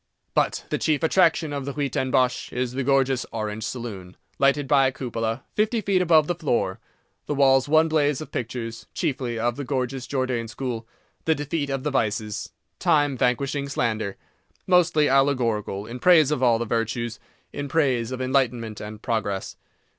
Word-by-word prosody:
But - - 0
the - - 0
chief 155 0 +1
attraction 160 -2 +3
of 140 -2 -3
the 140 - -4
Huis 140 -2 -2
ten 130 - -1
Bosch 125 -1 +1
is 125 0 -2
the 135 +2 -2
gorgeous 135 -1 +2
Orange 110 -1 -4
Saloon, 100 -8 -6 0.2
lighted 140 +1 +3
by 135 -1 +5
a - - 0
cupola, 115 -2 -3
fifty 220 +2 +1
feet 195 -3 +1
above 160 -4 +5
the 175 - 0
floor, 130 - -1 0.5
the 145 - -1
walls 135 0 +4
one 160 +1 +5
blaze 150 -3 +1
of 155 - -8
pictures, 115 -1 -5
chiefly 130 -8 -2
of 120 +1 -1
the 145 - -3
gorgeous 130 -1 -2
Jordaen 130 -4 -1
school—"The 125 +5 -4
Defeat 145 0 -2
of 135 -1 -2
the 150 - -1
Vices," 110 -4 -1 0.3
"Time 145 -5 +3
Vanquishing 140 +3 0
Slander"—mostly 145 - 0
allegorical, 120 -7 +1
in 120 +3 -7
praise 160 -4 +5
of 150 - 0
all 120 -3 +4
the 120 - -2
virtues, 115 0 -2 0.3
in 145 - -4
praise 130 -5 +1
of 130 - -4
enlightenment 125 -5 0
and 105 0 -8
progress. 105 -5 -2
130 Hz, 165 wpm, -24 LUFS, 115-145 Hz, 0.5 s, by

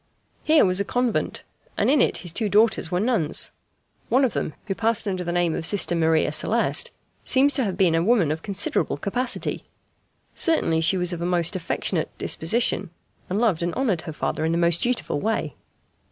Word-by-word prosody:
Here 310 -4 +4
was 185 0 +2
a - - +1
convent, 245 +2 -2 0.3
and - - +1
in 280 0 +4
it - - +3
his 175 - -5
two 215 +4 -2
daughters 215 -3 +2
were 180 - -1
nuns. 205 -8 +1 0.6
One 265 +2 +3
of 240 - -2
them, 155 - -3
who 195 - -2
passed 225 +1 0
under 185 -2 -2
the 175 - -3
name 175 -2 0
of - - -4
Sister 180 -1 +2
Maria 160 -2 +2
Celeste, 210 +10 +1 0.3
seems 280 +2 +3
to 265 - +1
have 190 -5 -3
been 185 -4 +3
a 165 - +2
woman 195 -5 +2
of 155 +1 -4
considerable 195 -7 -1
capacity 240 - -2 0.7
certainly 165 - +1
she 175 +4 +3
was 180 0 0
of 170 - -6
a - - -2
most 175 -1 +1
affectionate 175 -3 -1
disposition 200 +1 +1 0.4
and 190 - -2
loved 215 -9 +1
and 170 0 -2
honoured 220 -11 0
her 160 - -7
father 155 - -3
in 160 +1 0
the - - 0
most 170 0 +2
dutiful 240 -11 -1
way. 220 +8 -2
185 Hz, 195 wpm, -23 LUFS, 165-230 Hz, 0.7 s, Here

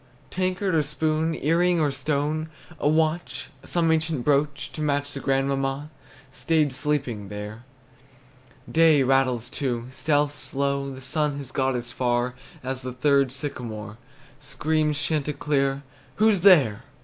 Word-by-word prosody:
Tankard, 185 +1 0
or 160 - +4
spoon, 155 +2 0
Earring, 170 +4 +2
or 150 -2 +2
stone, 150 +3 -1 0.3
A 145 - +2
watch, 160 +2 0
some 165 -2 +1
ancient 160 -5 0
brooch 145 0 +1
To 155 - -5
match 145 -1 0
the 140 - -5
grandmamma, 135 +2 -1 0.4
Staid 150 -1 +1
sleeping 130 -6 -2
there. 105 +3 -7 1.0
Day 160 -4 +5
rattles, 130 -3 +2
too, 125 -4 -3
Stealth's 145 +1 0
slow; 140 0 -1
The 130 0 -9
sun 150 +1 -1
has 140 -3 -7
got 130 -1 0
as 120 0 -4
far 120 0 0 0.3
As 130 0 -3
the 130 -1 -5
third 140 0 +3
sycamore. 115 -6 -6 0.4
Screams 150 +1 0
chanticleer, 145 -2 0 0.3
"Who's 215 -3 +3
there?" 140 - +5
145 Hz, 130 wpm, -25 LUFS, 130-155 Hz, 1.0 s, Day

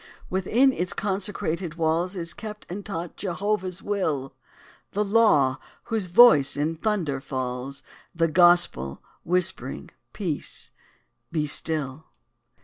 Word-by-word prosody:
Within 230 +9 +3
its 180 -4 -2
consecrated 190 -4 -1
walls 165 +3 0
Is 170 -2 -4
kept 210 -1 -8
and 200 +3 -5
taught 175 -4 -5
Jehovah's 190 0 -2
will: 155 -10 -2 0.6
The 210 - +1
LAW, 195 - +4 0.3
whose 220 -5 -2
voice 175 - +6
in 155 +3 -1
thunder 165 -9 -1
falls 130 0 -4 0.3
The 165 0 +2
GOSPEL, 175 - +4 0.2
whispering, 180 +1 0 0.2
"_Peace! 170 -8 -3 0.6
be 155 -2 0
still! 150 -1 -2
175 Hz, 110 wpm, -25 LUFS, 150-200 Hz, 0.6 s, voice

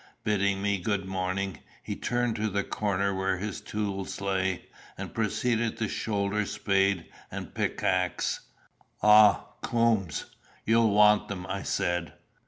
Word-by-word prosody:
Bidding 100 -2 +1
me 100 -1 +1
good 100 +1 -1
morning, 95 0 -2 0.2
he - - -4
turned 120 -1 -1
to 110 +1 0
the 100 0 0
corner 100 -1 -1
where 95 0 0
his 105 +1 -4
tools 100 -2 -3
lay, 95 -2 -1 0.3
and - - -6
proceeded 115 +1 0
to 110 - -1
shoulder 105 0 -1
spade 95 -3 +1 0.2
and - - -7
pickaxe. - - 0 0.6
"Ah, 105 -1 +7 0.2
Coombes! 115 -7 +1 0.4
you'll 115 0 +4
want 105 0 +5
them," 95 -3 -5
I 95 +1 -3
said. 90 -4 -1
100 Hz, 130 wpm, -28 LUFS, 95-105 Hz, 0.6 s, Ah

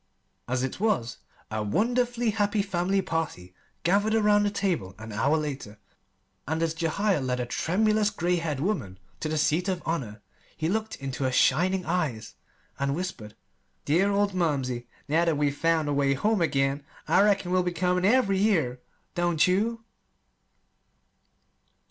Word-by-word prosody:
As 125 +1 -1
it 130 - -3
was, 195 - 0 0.3
a 110 0 -2
wonderfully 240 - +1
happy 205 0 +1
family 190 0 0
party 160 - -3 0.3
gathered 205 +5 +2
around 210 -1 +4
the 205 - +2
table 175 - -2
an 110 +1 -9
hour 140 +9 +2
later; 140 -9 -5 0.7
and 160 +2 0
as 165 -1 0
Jehiel 170 +2 0
led 125 -1 -1
a 125 - -1
tremulous, 210 - +1
gray 180 -3 0
haired 160 -5 -2
woman 145 - -2 0.2
to 155 - -3
the 155 - -1
seat 160 +4 +1
of 185 -2 -2
honor, 115 -11 -3 0.3
he 160 - -1
looked 220 +3 -2
into 135 0 -5
her 130 - +1
shining 180 +7 +2
eyes 150 -11 -2 0.5
and 140 0 0
whispered: 155 - -5 0.5
"Dear 180 +7 +3
old 200 0 +1
mumsey, 135 -9 -1 0.2
now 160 +4 +2
that 165 -3 +1
we've 145 -1 +1
found 165 0 +1
the 145 - 0
way 140 -1 +2
home 210 +7 +1
again, 140 -2 +1 0.2
I - - +4
reckon 200 -3 +2
we'll 185 0 +3
be 180 0 -1
coming 180 +1 0
every 200 -2 +3
year 160 - +1 0.3
don't 175 -3 +2
you?" 225 +5 0
170 Hz, 155 wpm, -27 LUFS, 140-200 Hz, 0.7 s, around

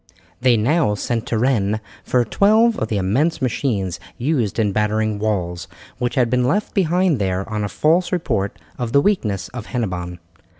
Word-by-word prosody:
They 125 -2 +4
now 125 0 +2
sent 115 +2 -2
to 115 - 0
Rennes 110 -4 +1 0.3
for 125 -1 +1
twelve 220 - +3
of - - -1
the 105 - -1
immense 125 - +1
machines 115 - -1 0.2
used 125 - 0
in 105 -3 +2
battering 105 +1 0
walls, 90 -5 -2 0.3
which 125 +2 -1
had 125 -3 +3
been 125 +1 +1
left 205 +10 0
behind 180 - +2
there 95 -1 -1
on 105 -1 -3
a 105 - -2
false 170 - +2
report 115 - -1 0.2
of 120 -1 -3
the 140 - +6
weakness 110 - 0
of 120 -3 -8
Hennebon. 90 -8 -3
115 Hz, 170 wpm, -20 LUFS, 105-145 Hz, 0.3 s, the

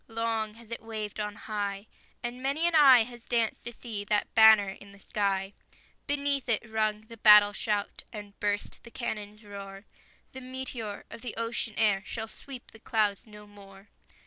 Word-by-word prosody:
Long 225 -1 -2
has 230 0 -16
it 230 - -4
waved 220 -2 -5
on 210 -1 -3
high, 205 -1 -4 0.4
And 240 +1 -4
many 280 +5 0
an 345 - +2
eye 270 -6 +8
has 240 +1 -11
danced 230 -2 0
to 240 - -5
see 225 -3 -5
That 205 0 0
banner 220 -3 +7
in 200 +1 -13
the 200 - -16
sky; 195 -1 -1 0.5
Beneath 280 -2 -1
it 220 0 +1
rung 215 -1 0
the 230 +1 -13
battle 210 -1 +8
shout, 205 -1 -2
And 205 -2 -9
burst 205 0 -2
the 235 - -13
cannon's 210 -2 -5
roar; 200 -1 -9 0.5
The 260 - -9
meteor 255 -5 -5
of - - -9
the 245 -3 -5
ocean 230 -1 -2
air 210 -3 +3
Shall 220 +1 -5
sweep 255 +2 -9
the 220 - -15
clouds 215 -2 0
no 210 -1 -12
more! 200 -1 -16
220 Hz, 175 wpm, -29 LUFS, 205-235 Hz, 0.5 s, eye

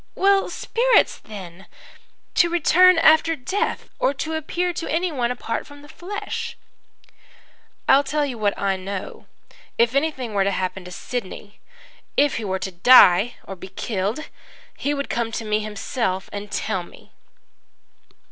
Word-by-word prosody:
"'Well, 395 0 +3
spirits - - +2
then 190 -3 -11 0.7
to 345 - +4
return 350 +2 +5
after 325 0 +5
death, 380 - -2
or 280 - +1
to 315 +4 -4
appear 345 +3 -2
to 345 - -4
anyone 315 -8 0
apart 240 -2 -4
from 285 0 -14
the - - -13
flesh?' 375 +7 -6 1.3
"'I 270 - +7
will 280 - +2
tell 295 +1 0
you 265 -3 -4
what 205 -1 0
I 195 -1 0
know. 190 +1 -7 0.5
If 235 +1 +3
anything 275 -5 -1
were 200 -1 +2
to 195 - +1
happen 185 -1 -3
to 180 - -9
Sidney 205 +1 -6 0.6
if 290 0 +3
he 230 - -4
were 190 -1 -1
to 190 - -5
die 195 +2 +6
or 195 - -8
be 190 - -10
killed 200 +5 -3 0.5
he 290 +1 -1
would 280 0 -3
come 235 -1 -2
to 225 - -4
me 215 0 +1
himself 210 -2 -3
and 205 0 -6
tell 185 - -2
me.' 175 - -15
245 Hz, 155 wpm, -22 LUFS, 200-315 Hz, 1.3 s, I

